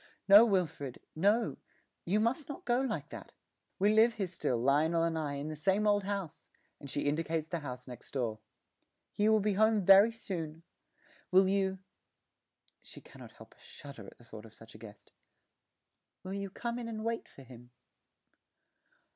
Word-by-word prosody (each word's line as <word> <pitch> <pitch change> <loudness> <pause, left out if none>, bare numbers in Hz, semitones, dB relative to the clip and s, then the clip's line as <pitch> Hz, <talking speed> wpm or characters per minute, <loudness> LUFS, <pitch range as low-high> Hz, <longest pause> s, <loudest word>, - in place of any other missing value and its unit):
'No, 205 +3 +9
Wilfred, 160 - -2 0.2
no; 205 +8 +1 0.5
you 200 +5 +1
must 245 +7 -1
not 285 - -8
go 245 +1 +2
like 265 - -3
that. - - -10 0.5
We 205 +2 +3
live 225 +1 +4
here 200 - -2
still, 170 -8 -2
Lionel 150 +7 +2
and 165 -1 0
I, 150 -3 -3
in 140 +2 -5
the 155 - -5
same 195 +7 +1
old 205 -1 +2
house,' 195 -5 -5 0.3
and 140 - -10
she 145 - -2
indicates 160 +1 -1
the 170 0 -3
house 125 -4 -8
next 125 -1 -11
door; 115 -5 -3 0.7
'he 210 +1 +1
will 220 0 +4
be 210 0 0
home 215 -1 +2
very 195 +4 +7
soon. 165 -8 -6 0.7
Will 190 +1 +5
you' 190 0 0 1.0
(she - - -13
cannot - - -14
help - - -16
a - - -31
little - - -23
shudder 140 -8 -11
at - - -14
the 120 - -19
thought 110 -1 -11
of 110 - -18
such 115 0 -15
a 110 - -14
guest) 105 -2 -14 1.1
'will 185 - -6
you 200 0 -4
come 235 +5 -5
in 235 - -6
and 220 -1 -6
wait 230 0 -3
for 135 - -15
him?' 120 -1 -14
185 Hz, 180 wpm, -31 LUFS, 145-210 Hz, 1.1 s, No